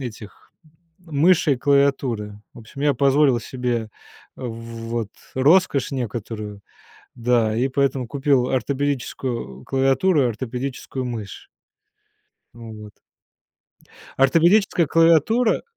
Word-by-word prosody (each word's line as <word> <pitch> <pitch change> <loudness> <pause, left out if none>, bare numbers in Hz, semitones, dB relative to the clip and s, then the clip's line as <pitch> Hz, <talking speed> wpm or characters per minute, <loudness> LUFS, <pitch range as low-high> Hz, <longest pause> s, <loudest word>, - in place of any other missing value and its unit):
этих, 110 -5 -9 0.6
мыши 165 -1 +2
и - - 0
клавиатуры. 130 -6 0
В - - -14
общем, 115 +4 -12
я 145 0 +3
позволил 140 0 +3
себе 120 -2 -3 0.4
вот 115 -1 -5 0.3
роскошь 145 +1 +3
некоторую, 110 -4 -5 0.6
да, 115 -2 +1
и 125 +3 +1
поэтому 135 -1 0
купил 135 -1 +1
ортопедическую 130 - -3
клавиатуру 135 +5 +2
и - - +2
ортопедическую 130 +3 -5
мышь. 115 -5 -7 1.1
Ну 115 -1 -10
вот. 105 -1 -13 1.2
Ортопедическая 170 +6 +3
клавиатура- 165 - +3
130 Hz, 95 wpm, -22 LUFS, 115-140 Hz, 1.2 s, я